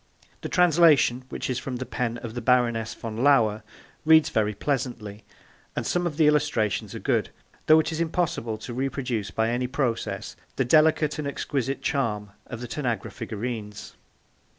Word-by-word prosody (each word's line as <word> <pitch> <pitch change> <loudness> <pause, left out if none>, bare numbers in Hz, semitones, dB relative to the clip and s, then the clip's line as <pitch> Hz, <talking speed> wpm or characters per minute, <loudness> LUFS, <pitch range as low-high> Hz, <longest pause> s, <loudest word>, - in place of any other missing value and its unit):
The - - -5
translation, 155 -8 +4
which - - -4
is 125 -1 -1
from 130 - -5
the 130 +1 -4
pen 120 -2 -2
of 115 -2 -6
the 120 - -4
Baroness 120 -2 +1
von 110 -1 -6
Lauer, 110 -7 +4 0.4
reads 160 0 +6
very 105 -1 0
pleasantly, 115 -6 -3 0.5
and - - -2
some 175 0 0
of 150 -4 -5
the 160 - +4
illustrations 145 -8 +1
are - - -5
good, - - 0 0.4
though 155 0 +7
it 160 - 0
is 160 +1 -2
impossible 160 -9 -1
to 120 - -8
reproduce 125 -4 -2
by 110 +1 0
any 125 +1 -1
process 130 -3 -2 0.2
the 135 - 0
delicate 155 +2 +3
and 150 - -2
exquisite 135 -1 -3
charm 105 -7 -1 0.2
of 120 - -7
the 120 - -5
Tanagra 120 -6 -3
figurines. 110 -2 -6
125 Hz, 165 wpm, -25 LUFS, 115-150 Hz, 0.5 s, though